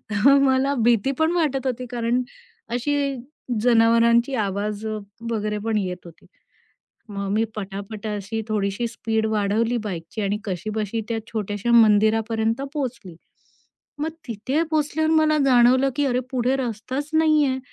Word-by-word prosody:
आहे, 200 - -1
तर 275 0 +8
मला 265 +1 +2
भीती 235 +2 +3
पण 320 +1 +3
वाटत 280 -6 0
होती 255 0 -3
कारण 240 +1 0 0.5
अशी 280 +2 0 0.5
जनावरांची 235 +1 +4
आवाज 205 0 -2
व 215 0 -2 0.3
वगैरे 215 -1 -1
पण 220 -1 +1
येत 185 -3 -2
होती. 170 - -15 0.8
मग 200 -1 -4
मी 220 +2 +2
पटापटा 205 +1 -6
अशी 210 +3 -4
थोडीशी 210 +2 -1
स्पीड 220 -1 -2
वाढवली 220 +2 +1
बाईकची 190 +1 -5
आणि 200 +1 0
कशीबशी 215 +3 -3
त्या 225 - -1
छोटयाशा 210 +1 -3
मंदिरापर्यंत 225 +1 +3
पोहोचली. 235 - -5 0.8
मग 310 +2 -1 0.2
तिथे 240 +7 -1
पोहोचल्यावर 315 +1 +1
मला 310 -1 +3
जाणवलं, 255 +1 +5
की 290 0 +1
अरे! 250 -2 +1
पुढे 255 +1 +1
रस्ताच 260 +4 -4
नाही 310 -1 +4
आहे 260 -1 -1
230 Hz, 140 wpm, -23 LUFS, 210-265 Hz, 0.8 s, तर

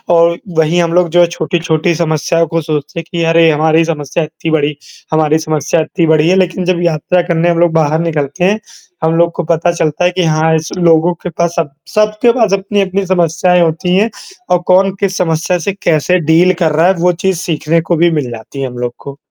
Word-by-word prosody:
और 170 0 +3 0.2
वहीं 165 +2 +2
हम 170 0 -1
लोग 180 -1 +2
जो 175 - +3
हैं 170 - +4
छोटी-छोटी 165 0 -1
समस्याओं 165 0 0
को 165 +1 -2
सोचते 150 +1 -4
हैं - - -6
कि 170 -1 -2
अरे! 165 0 +4
हमारी 160 +2 +2
समस्या 155 0 -3
इत्ती 160 +1 -6
बड़ी 150 -2 0 0.4
हमारी 155 0 +2
समस्या 155 0 -1
इत्ती 165 +2 -1
बड़ी 155 +1 +3
है 185 - +3
लेकिन 185 -1 0
जब 180 -1 0
यात्रा 170 +2 +1
करने 170 -1 0
हम 170 -1 +1
लोग 175 -1 +3
बाहर 155 0 +1
निकलते 165 0 -2
हैं, 205 +4 +2 0.4
हम 160 +1 +1
लोग 170 0 +2
को 175 - -2
पता 170 +1 +1
चलता 160 0 -1
है 180 - +3
कि 180 0 -1
हाँ, 160 0 +1
इस 160 0 -3
लोगों 170 0 +3
के 180 - -3
पास 170 +1 -2
सब 160 -4 -2 0.2
सबके 215 +3 +2
पास 220 -6 +1
अपनी-अपनी 195 0 -1
समस्याएँ 175 0 +1
होती 180 +3 0
हैं, 215 +4 +2 0.4
और 180 - +3
कौन 190 +1 +4
किस 195 -2 -1
समस्या 170 +1 0
से 200 - -1
कैसे 170 +3 +2
डील 180 +3 +4
कर 160 -3 +1
रहा 160 +4 +2
है 190 - +4
वो 180 +1 +3
चीज़ 190 -3 +1
सीखने 165 -1 -1
को 170 +1 -1
भी 170 +1 +2
मिल 145 -6 -2
जाती 115 +4 -8
है 135 - -2
हम 125 -1 -9
लोग 120 0 -3
को। 140 0 -10
170 Hz, 220 wpm, -13 LUFS, 155-180 Hz, 0.4 s, हैं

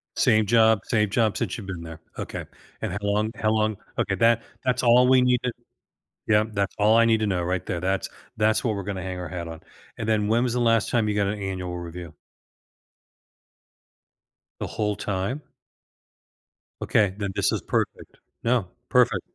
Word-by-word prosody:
Same 110 -1 +3
job 110 -1 +5
same 105 -3 +1
job 110 -1 +1
since - - -2
you've 100 -4 -8
been 90 -3 -5
there. 80 -1 -9 0.2
Okay. - - -5 0.4
And - - -2
how - - -3
long 105 +2 0
how 110 0 0
long, 110 -1 +1 0.2
okay. - - +1
That 115 0 +4 0.2
that's 125 0 +1
all 125 +1 +6
we 130 -1 +6
need 125 -1 +3
t 125 - 0 0.8
Yeah. 105 -1 +4
That's 100 -2 -1
all 110 +2 +5
I 115 - +6
need 115 -1 +3
to 110 - +1
know 90 -3 0
right 90 0 -1
there. 85 - -2
That's 95 +1 -1 0.3
that's 110 +2 +2
what 115 -3 +1
we're 100 - -4
gonna 95 -1 -4
hang 90 0 -5
our 90 -2 -5
hat 85 -2 -5
on. 80 -1 -8 0.4
And 110 - -4
then 105 -2 +2
when 115 +2 +3
was 125 -1 0
the 125 - 0
last 115 -2 +2
time 115 -3 +1
you 105 - 0
got 100 -1 +1
an 105 - -2
annual 90 -2 -4
review? 85 -2 -8 2.5
The - - -3
whole 105 -2 -2
time? 105 +7 -2 1.4
Okay. 100 -4 +2
Then 100 -2 -3
this - - +2
is - - -1
perfect. - - -3 0.3
No. 115 -5 +1 0.2
Perfect. - - +3
105 Hz, 190 wpm, -25 LUFS, 95-115 Hz, 2.5 s, all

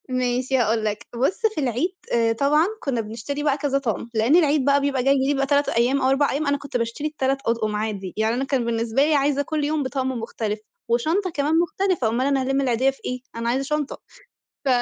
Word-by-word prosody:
ماشي 255 +1 0
هاقول 225 -2 +1
لك، 210 +2 -3
بُص 260 - 0
في 305 - -1
العيد 260 - 0 0.2
آآ 230 -1 +3
طبعًا 290 +6 +3
كنا 260 -6 -1
بنشتري 230 +7 -5
بقى 290 -2 +2
كذا 280 -1 0
طقم، 235 -4 -3
لأن 225 +7 +3
العيد 300 -5 +3
بقى 280 0 +4
بيبقى 275 -3 0
جاي 275 +2 +4
بيبقى 275 -1 +1
3 285 +1 +2
أيام، 250 +4 +2
أو 260 - +3
4 275 +2 +2
أيام. 290 +2 -1
أنا 285 0 +2
كنت 280 -2 -4
باشتري 230 +6 -2
ال3 275 -3 0
أطقم 220 -2 0
عادي، 210 -3 -3
يعني 220 +1 +1
أنا 260 - -1
كان 270 -3 0
بالنسبة 230 +2 0
لي 310 0 +2
عايزة 285 0 +2
كل 300 +1 -2
يوم 300 0 0
بطقم 260 0 -2
مختلف، 225 -3 -3 0.3
وشنطة 320 - +1
كمان 310 0 +1
مختلفة، 350 - 0
اومال 235 +4 0
أنا 275 -1 +2
هالِم 270 +1 0
العيدية 260 0 +2
في 270 - -6
إيه؟ 250 - -3 0.2
أنا 230 0 -2
عايزة 260 +3 0
شنطة. 300 0 -2 0.7
ف - - 0
270 Hz, 215 wpm, -23 LUFS, 235-285 Hz, 0.7 s, بقى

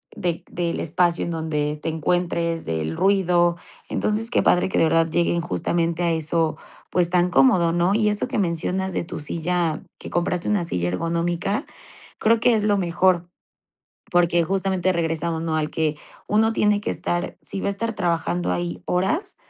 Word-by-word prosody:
de 175 -2 -2
del 170 -1 -2
espacio 170 +1 +1
en 170 - -3
donde 150 -2 -2
te - - -2
encuentres, 170 +1 -1
del 80 0 -2
ruido. 175 -3 +3 0.3
Entonces, 220 +2 0
qué - - +2
padre 180 - +3
que - - -1
de - - +4
verdad 165 0 +3
lleguen 170 +1 +1
justamente 170 0 -1
a 170 - +2
eso, 160 0 0 0.3
pues, 175 -2 +2
tan 180 0 +2
cómodo, 165 +3 +4
¿no? 175 +3 +2
Y 215 -1 +3
eso 210 +3 -1
que 255 -1 -3
mencionas 185 +1 -1
de - - -1
tu - - -7
silla, 165 +1 -1 0.2
que - - -8
compraste 175 0 -1
una 205 -5 +1
silla 90 - -1
ergonómica, 170 - -1 0.5
creo 230 +1 +3
que 240 +1 +4
es 215 - 0
lo 205 -1 +2
mejor, 175 -1 +2 0.9
porque, 175 -1 +3
justamente, 190 0 0
regresamos, 165 -1 -1
¿no?, 160 -1 -1
al 155 -1 -1
que 155 -2 -1 0.3
uno 220 +2 +3
tiene 210 -2 +2
que - - -3
estar 175 +1 -2
si 195 - -5
va - - -3
a - - +2
estar 230 +3 -3
trabajando 90 - 0
ahí 90 0 -3
horas, 190 - 0
175 Hz, 175 wpm, -23 LUFS, 165-190 Hz, 0.9 s, de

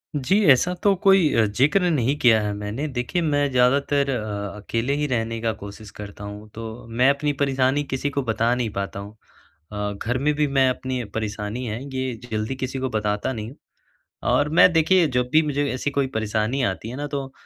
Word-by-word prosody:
जी, 150 +9 +2
ऐसा 135 +8 +3
तो 200 - +5
कोई 195 -5 +5
अ, 115 - +4
ज़िक्र 145 - +2
नहीं 140 -4 +1
किया 115 -3 +5
है 105 0 -2
मैंने, 105 +8 -4
देखिए 130 +5 -2
मैं 145 -3 +1
ज़्यादातर 140 +3 +2
अ 105 -5 -3
अकेले 115 +5 -2
ही 150 0 0
रहने 115 -3 -2
का 115 -1 +1
कोशिश 100 0 -10
करता 100 0 -8
हूँ, 105 +1 -8
तो 115 +1 -8
मैं 125 +4 +3
अपनी 145 +1 +1
परेशानी 135 +1 +2
किसी 140 0 -2
को 140 0 -2
बता 115 0 +1
नहीं 125 -2 -1
पाता 100 0 -3
हूँ। 100 +1 -8 0.6
अ, 105 0 -3
घर 125 +3 0
में 150 +3 +1
भी 150 0 +1
मैं 135 -1 +3
अपनी 130 -1 -3
परेशानी 105 +2 -3
है 110 0 -4 0.2
ये 130 -1 -2 0.2
जल्दी 110 +4 -2
किसी 130 0 -4
को 130 0 -2
बताता 105 +2 -1
नहीं 110 +1 -6 0.8
और 145 +4 +2
मैं 170 +3 +6
देखिए 165 +2 +4
जब 125 0 +1
भी 155 - +6
मुझे 145 -1 -1
ऐसी 130 +3 -2
कोई 140 -1 0
परेशानी 110 +4 0
आती 110 0 -2
है 125 - -6
ना 145 +1 -3
तो 140 -2 -4
125 Hz, 200 wpm, -23 LUFS, 110-140 Hz, 0.8 s, मैं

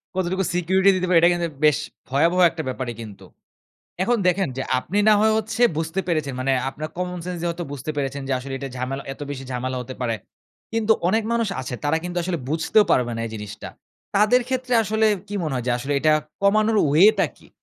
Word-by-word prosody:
কতটুকু 190 +1 0
security 190 +3 +3
দিতে 185 0 -1
পারে 180 -2 +5
এটা 170 - +6
কিন্তু 175 -1 -1 0.2
বেশ 150 -1 +5 0.3
ভয়াবহ 165 +7 +2
একটা 160 -1 -6
ব্যাপারই 130 -2 -3
কিন্তু। 105 -3 -10 0.8
এখন 240 +4 +2
দেখেন 185 +1 +2
যে, - - -1 0.2
আপনি 185 +9 -4
না - - +7
হয় 220 0 +4
হচ্ছে 220 +2 -3 0.2
বুঝতে 165 +3 -2
পেরেছেন। 155 -6 -1
মানে 130 +1 0 0.2
আপনার 155 +3 -6
common 180 0 -3
sense 180 -1 -4
দিয়ে 175 - -1
হয়তো 170 +1 -6
বুঝতে 145 +2 -4
পেরেছেন 140 0 -2
যে, 135 - 0
আসলে 135 +1 -7
এটা 135 - -5
ঝামেলা 130 +2 -4
এত 135 - -15
বেশি 135 -2 -5
ঝামেলা 130 +1 -3
হতে 125 +1 -8
পারে 115 -2 0 0.6
কিন্তু 225 -1 +3
অনেক 220 +4 +2
মানুষ 230 -1 +1
আছে 130 - -6
তারা 145 +2 +2
কিন্তু 180 0 -4
আসলে 175 0 -2
বুঝতেও 165 +8 +3
পারবে 120 -2 +2
না - - -4
এই - - -10
জিনিসটা। 105 0 -8 0.5
তাদের 215 +5 +4
ক্ষেত্রে 255 -1 -2
আসলে 220 +1 +1 0.2
কী 205 - -8
মনে 155 -3 -2
হয় 125 -2 -3
যে - - +3
আসলে 135 +4 -3
এটা 155 +2 +3 0.3
কমানোর 215 +2 +3 0.2
way 180 +8 +8
টা - - +4
কী? - - -20
170 Hz, 210 wpm, -23 LUFS, 135-195 Hz, 0.8 s, way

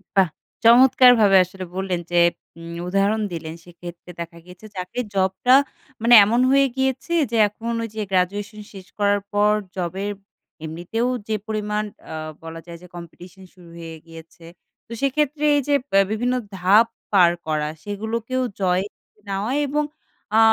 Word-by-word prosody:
বাহ! 190 -4 +4 0.4
চমৎকারভাবে 240 -4 +6
আসলে 185 0 -9
বললেন 190 -2 -2
যে 175 - +1 0.4
উম 170 0 -9 0.2
উদাহরণ 200 +3 +1
দিলেন 160 -1 -6
সেক্ষেত্রে 175 0 -11
দেখা 170 0 -7
গিয়েছে 180 +4 -14
চাকরির 185 +6 -4
জবটা 190 +7 +3 0.5
মানে 235 +1 +4
এমন 235 +4 +1
হয়ে 275 0 +4
গিয়েছে 265 +4 -1 0.2
যে 230 - 0
এখন 225 +3 -6
ওই 225 - -5
যে 215 - -3
গ্র্যাজুয়েশন 205 +4 -1
শেষ 190 -2 -11
করার 205 0 +2
পর 205 +1 +3 0.2
জবের 190 +3 -3 0.5
এমনিতেও 175 +10 -3 0.2
যে 215 - 0
পরিমাণ 210 -1 -2 0.3
আ - - -5 0.3
বলা 165 0 -8
যায় 170 -1 -10
যে 180 - -13
কম্পিটিশন 175 +2 -12
শুরু 175 -2 -17
হয়ে 165 -1 -8
গিয়েছে। 165 0 -14 0.4
তো - - -18
সেক্ষেত্রে 295 +2 0
এই 285 - +2
যে 290 - +3 0.2
বে 195 - +5
বিভিন্ন 245 +3 0 0.2
ধাপ 200 +6 +5 0.3
পার 175 -3 +6 0.2
করা। 150 -1 -1 0.2
সেগুলোকেও 220 +5 -3 0.2
জয় 185 0 +2 0.5
নেওয়া 200 +5 -2 0.2
এবং 300 +2 0 0.5
আ - - +7
200 Hz, 150 wpm, -22 LUFS, 180-230 Hz, 0.5 s, আ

